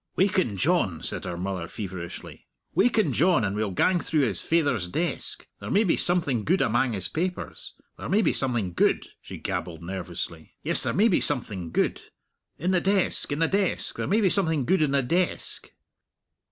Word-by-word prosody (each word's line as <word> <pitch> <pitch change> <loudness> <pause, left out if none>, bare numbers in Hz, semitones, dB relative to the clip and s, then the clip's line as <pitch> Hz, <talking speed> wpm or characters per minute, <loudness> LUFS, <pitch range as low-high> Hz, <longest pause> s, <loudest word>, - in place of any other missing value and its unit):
"Waken 185 - +2
John," 120 - +1
said - - +1
her 85 - -4
mother 90 -2 -3
feverishly 95 -3 -7 0.3
"waken 220 - +3
John, 170 -2 +3
and 100 -1 -1
we'll 105 -1 -1
gang 175 - +2
through 155 -2 0
his 110 -10 +1
faither's 145 - +1
desk. 160 - -3
There - - -7
may 205 +3 +4
be 180 - +2
something 150 -10 +1
gude 180 - +2
amang 120 +2 +1
his 95 -4 -1
papers. 180 - -4 0.2
There - - -5
may 210 +3 +3
be - - +2
something 120 -9 -1
gude!" - - +2
she - - -9
gabbled 85 -1 -4
nervously; 85 -3 -6
"yes, - - +2
there - - 0
may 210 +5 +4
be 185 - +2
something 105 - -2
gude! - - 0 0.6
In 175 +5 0
the 180 -2 +3
desk 195 -5 +1
in 145 - 0
the 165 +1 +2
desk 195 -1 0
there - - -2
may 215 +4 +3
be 195 - +4
something 160 -9 +1
gude 190 +5 +2
in 150 - +3
the 140 -1 +2
desk!" 175 +7 -1
140 Hz, 185 wpm, -26 LUFS, -, 0.6 s, may